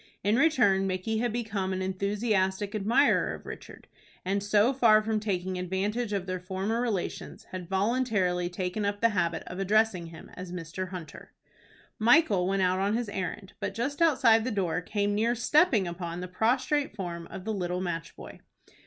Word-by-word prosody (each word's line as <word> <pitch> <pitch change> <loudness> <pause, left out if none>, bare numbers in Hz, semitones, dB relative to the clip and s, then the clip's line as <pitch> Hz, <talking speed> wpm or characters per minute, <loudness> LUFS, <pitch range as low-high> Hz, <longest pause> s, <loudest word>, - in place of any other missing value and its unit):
In 205 +3 +3
return, 240 -10 +3
Micky 190 +4 -1
had 240 0 0
become 210 -5 -2
an 185 0 -2
enthusiastic 200 +1 0
admirer 220 +7 +2
of - - -14
Richard, - - -10 0.4
and, 195 +2 0
so 210 +5 +3
far 220 -5 +5
from 220 0 0
taking 185 -3 -2
advantage 205 +5 -2
of 200 -3 -1
their 185 -1 -3
former 190 +5 -2
relations, 220 -7 -3
had 185 -2 -6
voluntarily 195 -4 +1
taken 180 +3 -3
up 205 0 -1
the 230 - +4
habit 170 -5 -1
of 180 - -7
addressing 200 -3 +2
him 165 -1 -12
as 180 -1 -8
Mr. 180 +1 -5
Hunter. 170 -5 -9 0.7
Michael 220 - +4
went 195 0 +1
out 185 0 +2
on 200 +3 +1
his 240 -3 -3
errand, 195 0 -5
but - - -4
just 275 +7 -3
outside 250 -9 +5
the 255 - -1
door 180 -6 -1
came 205 +2 -1
near 230 +3 +1
stepping 240 - +3
upon 170 0 -5
the 180 - -5
prostrate 250 +8 0
form 170 -4 -5
of 185 - -9
the 220 - -1
little 180 -2 -2
match 175 -3 -4
boy. - - -11
200 Hz, 175 wpm, -28 LUFS, 185-225 Hz, 0.7 s, far